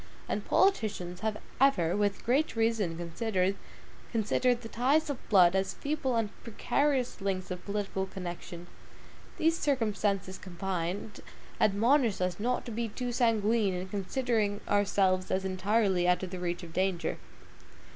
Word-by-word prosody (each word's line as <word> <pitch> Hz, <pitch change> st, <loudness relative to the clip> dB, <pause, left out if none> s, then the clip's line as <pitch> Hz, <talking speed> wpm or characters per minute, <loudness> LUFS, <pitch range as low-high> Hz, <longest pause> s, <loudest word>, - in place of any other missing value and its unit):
And -, -, -2 dB
politicians 210 Hz, -, +1 dB
have 215 Hz, -1 st, -2 dB, 0.2 s
ever 195 Hz, -12 st, +3 dB
with 205 Hz, -1 st, 0 dB
great 265 Hz, +3 st, +2 dB
reason 225 Hz, -7 st, +1 dB
considered 185 Hz, +2 st, 0 dB, 0.6 s
the 235 Hz, +2 st, +1 dB
ties 280 Hz, +8 st, +2 dB
of 275 Hz, -, -9 dB
blood 185 Hz, -3 st, +6 dB
as 190 Hz, 0 st, 0 dB
feeble 285 Hz, -4 st, -1 dB
and 225 Hz, -2 st, +1 dB
precarious 260 Hz, +1 st, 0 dB
links 190 Hz, -1 st, -2 dB
of 180 Hz, 0 st, -5 dB
political 200 Hz, -2 st, -2 dB
connection. 175 Hz, -1 st, -7 dB, 0.7 s
These 325 Hz, +1 st, +2 dB
circumstances 205 Hz, -8 st, 0 dB
combined, 185 Hz, +2 st, -4 dB, 0.4 s
admonish 225 Hz, +2 st, +3 dB
us 180 Hz, 0 st, -1 dB
not 245 Hz, +4 st, -1 dB
to 240 Hz, -, -6 dB
be 230 Hz, +1 st, -2 dB
too 245 Hz, +3 st, -4 dB
sanguine 225 Hz, -4 st, +2 dB
in 180 Hz, +1 st, -5 dB
considering 205 Hz, +1 st, -1 dB
ourselves 195 Hz, -2 st, +2 dB
as 190 Hz, 0 st, 0 dB
entirely 190 Hz, -1 st, +1 dB
out 180 Hz, +1 st, +2 dB
of 185 Hz, -, -5 dB
the 185 Hz, -, -5 dB
reach 175 Hz, 0 st, -3 dB
of 165 Hz, -1 st, -10 dB
danger. 185 Hz, -1 st, -1 dB
205 Hz, 135 wpm, -30 LUFS, 185-235 Hz, 0.7 s, blood